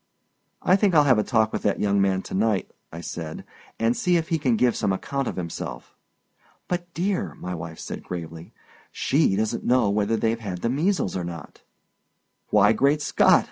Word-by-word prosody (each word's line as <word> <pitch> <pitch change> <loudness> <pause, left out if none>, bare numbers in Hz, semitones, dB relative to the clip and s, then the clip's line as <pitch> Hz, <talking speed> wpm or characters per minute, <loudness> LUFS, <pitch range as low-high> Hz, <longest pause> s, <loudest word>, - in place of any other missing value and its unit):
"I 185 - +5
think 195 -3 +2
I'll 150 - +7
have 130 -6 +4
a - - +2
talk 110 -3 +1
with - - -2
that 100 - 0
young 100 -1 +2
man 95 -1 +1
to - - -9
night," 105 0 0 0.2
I 85 - -7
said, 80 -2 -6 0.3
"and 115 +2 +1
see 180 -1 +2
if 160 -1 -3
he 165 - +1
can 130 -5 +2
give 120 +1 +2
some 105 - 0
account 135 +7 -2
of - - -3
himself." 85 -3 -6 0.7
"But, 180 - 0
my - - -28
dear," 190 +3 -1
my 90 - -6
wife 80 -1 -7
said, - - -6
gravely, 85 -2 -7 0.4
"she 140 -8 +2
doesn't 110 +3 -1
know 120 -5 +3
whether 105 +2 +1
they've 115 +1 0
had 95 -5 -6
the 115 - +1
measles 155 - 0
or 90 - -2
not." 85 -3 -8 0.9
"Why, 105 +1 +5
Great 140 +6 +2
Scott!" - - +5
110 Hz, 195 wpm, -24 LUFS, 95-140 Hz, 0.9 s, I'll